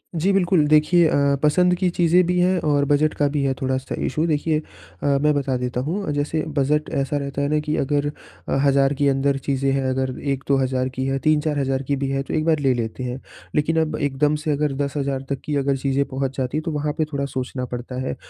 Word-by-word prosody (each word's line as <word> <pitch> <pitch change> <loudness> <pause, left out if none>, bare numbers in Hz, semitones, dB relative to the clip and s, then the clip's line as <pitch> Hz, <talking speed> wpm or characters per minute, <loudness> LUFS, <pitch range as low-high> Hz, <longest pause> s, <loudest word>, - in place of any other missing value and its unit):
जी 175 +5 +2
बिल्कुल। 180 -4 +3
देखिए 155 +3 +4
अ, 140 -3 +2
पसंद 180 +4 +4
की 185 0 +1
चीजें 175 +1 +3
भी 180 0 +1
हैं 180 +1 +3
और 145 -1 +2
बजट 145 +2 +2
का 145 - +2
भी 145 - 0
है 135 - +1
थोड़ा-सा 130 0 -2
इश्यू 155 +4 0
देखिए 155 0 +1
अ, - - -11 0.4
मैं 145 +2 +3
बता 140 -2 -1
देता 125 0 -3
हूँ। 170 +4 -2
जैसे 145 +2 -1 0.2
बजट 150 +2 +1
ऐसा 140 +1 0
रहता 140 0 -3
है 140 - +1
ना 150 - +2
कि 150 0 -2
अगर 145 +1 0 0.4
अ, - - +1
1,000 140 0 +3
के 145 +1 +1
अंदर 135 0 +1
चीजें 135 -1 0
हैं 135 0 0
अगर 130 0 -1 0.2
1-2,000 130 -1 0
की 130 +1 -2
है 135 0 0
3-4,000 145 -3 +1
की 140 +1 -1
भी 135 0 -2
हैं 135 0 -1
तो - - -6
एक 155 - 0
बार 160 -2 +2
ले 135 -2 +2
लेते 120 +1 -4
हैं। 125 +1 -4 0.4
लेकिन 155 +2 +2
अब 155 - -1
एकदम 145 +1 +1
से 155 - 0
अगर 145 0 0
10,000 140 -1 -2
तक 140 -1 -2
की 150 - -2
अगर 140 0 +1
चीजें 135 +1 0
पहुँच 135 0 -3
जाती 130 +3 -1
तो 165 - -4
वहाँ 150 0 -2
पे 155 - +1
थोड़ा 140 0 -1
सोचना 130 -1 -4
पड़ता 125 +1 -6
है। 70 - -3
140 Hz, 225 wpm, -22 LUFS, 135-150 Hz, 0.4 s, देखिए